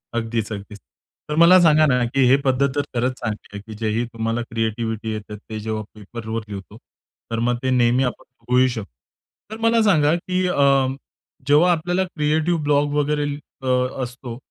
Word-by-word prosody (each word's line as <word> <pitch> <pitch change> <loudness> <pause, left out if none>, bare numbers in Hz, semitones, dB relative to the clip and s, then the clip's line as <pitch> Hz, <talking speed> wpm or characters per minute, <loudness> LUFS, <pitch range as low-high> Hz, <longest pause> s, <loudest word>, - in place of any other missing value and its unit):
अगदीच, 115 -1 -2
अगदीच. 100 +1 -9 0.5
तर 150 - -1
मला 175 +2 +8
सांगा 155 -2 +5
ना, 125 -4 +2
की 130 +2 +2
हे 135 - +6
पद्धत 135 +1 +2
तर 145 - +2
खरंच 125 +2 +1
चांगली 110 -3 -5
आहे, 100 - -6
की 110 +1 -10
जे 110 +1 -2
ही 120 - 0
तुम्हाला 115 +1 -2
क्रिएटिव्हिटी 110 -1 -3
येते 105 0 -7
ते 110 +1 -8
जेव्हा 110 0 -3
पेपरवर 110 +1 -6
लिहितो, 100 +1 -8 0.5
तर 115 - -1
मग 120 +1 +1
ते 130 - +1
नेहमी 125 +1 +3
आपण 125 +1 -3 0.2
बघूही 125 +1 +3
शक 115 -4 -4 0.7
तर 220 - -5
मला 230 0 +3
सांगा, 155 -7 +4
की 185 +1 -1
अ, 140 -5 +3 0.6
जेव्हा 150 +5 +5
आपल्याला 175 +2 0
क्रिएटिव्ह 160 -1 0
ब्लॉग 145 0 +2
वगैरे 150 0 0 0.4
अ, - - -4 0.4
असतो, 125 -1 -7
125 Hz, 175 wpm, -21 LUFS, 115-150 Hz, 0.7 s, मला